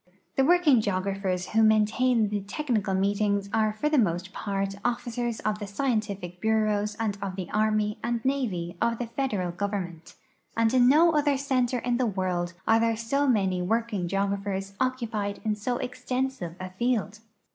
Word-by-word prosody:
The -, -, +3 dB
Avorking 305 Hz, -4 st, +5 dB
geog 190 Hz, -3 st, -1 dB
raphers 190 Hz, -2 st, -2 dB
Avho 225 Hz, 0 st, +3 dB
maintain 220 Hz, +2 st, +3 dB
tlie 205 Hz, -1 st, -2 dB
technical 220 Hz, -8 st, -1 dB
meetings 200 Hz, +1 st, 0 dB
are 220 Hz, -1 st, +2 dB
for 215 Hz, +8 st, -2 dB
the 300 Hz, -2 st, +3 dB
most 185 Hz, -3 st, 0 dB, 0.2 s
})art 195 Hz, 0 st, -1 dB
officers 240 Hz, -1 st, -2 dB
of 210 Hz, 0 st, -1 dB
the 205 Hz, -, -5 dB
scientific 200 Hz, -6 st, -2 dB
bureaus 215 Hz, -1 st, +1 dB
and 210 Hz, -3 st, -1 dB
of 195 Hz, -2 st, -3 dB
the 185 Hz, -2 st, -6 dB
arm}' 215 Hz, 0 st, +1 dB
and 235 Hz, 0 st, -2 dB
navy 210 Hz, -11 st, -1 dB
of 230 Hz, 0 st, +1 dB
the 245 Hz, -, -3 dB
federal 220 Hz, -7 st, -2 dB
government; 175 Hz, -3 st, -4 dB, 0.4 s
and 230 Hz, +1 st, +3 dB
in 250 Hz, -1 st, +6 dB
no 325 Hz, +5 st, +6 dB
other 290 Hz, -2 st, +2 dB
center 255 Hz, -2 st, 0 dB
in 245 Hz, 0 st, 0 dB
the 250 Hz, -1 st, +1 dB
Avorld 185 Hz, -3 st, -1 dB
are 225 Hz, 0 st, +5 dB
there 230 Hz, -1 st, +1 dB
so 275 Hz, +6 st, 0 dB
many 190 Hz, -7 st, +2 dB
AVorking 215 Hz, -1 st, -1 dB
geographers 195 Hz, +1 st, -2 dB
occupied 230 Hz, -6 st, -1 dB
in 215 Hz, -, +2 dB
so 235 Hz, +4 st, -2 dB
extensive 250 Hz, -7 st, -3 dB
a 185 Hz, 0 st, -6 dB
field. 215 Hz, 0 st, -1 dB
215 Hz, 170 wpm, -27 LUFS, 195-245 Hz, 0.4 s, in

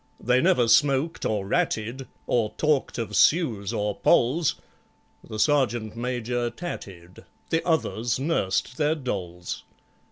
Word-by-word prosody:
They 125 Hz, +2 st, +2 dB
never 120 Hz, -2 st, +3 dB
smoked 140 Hz, +5 st, +2 dB
or 105 Hz, -3 st, -1 dB
ratted, 115 Hz, +6 st, -1 dB, 0.2 s
Or 115 Hz, -3 st, 0 dB
talked 150 Hz, -3 st, +1 dB
of 110 Hz, -3 st, -3 dB
Sues 110 Hz, -, +3 dB
or 105 Hz, 0 st, -1 dB
Polls; 140 Hz, +6 st, +3 dB, 0.7 s
The 110 Hz, -, -8 dB
Sergeant 120 Hz, -4 st, +1 dB
Major 120 Hz, 0 st, -2 dB
tatted, 95 Hz, -, -8 dB, 0.3 s
The 165 Hz, -, +1 dB
others 120 Hz, -8 st, 0 dB
nursed 130 Hz, -, -1 dB
their 150 Hz, 0 st, +2 dB
dolls. 90 Hz, -, -5 dB
120 Hz, 120 wpm, -25 LUFS, 105-145 Hz, 0.7 s, never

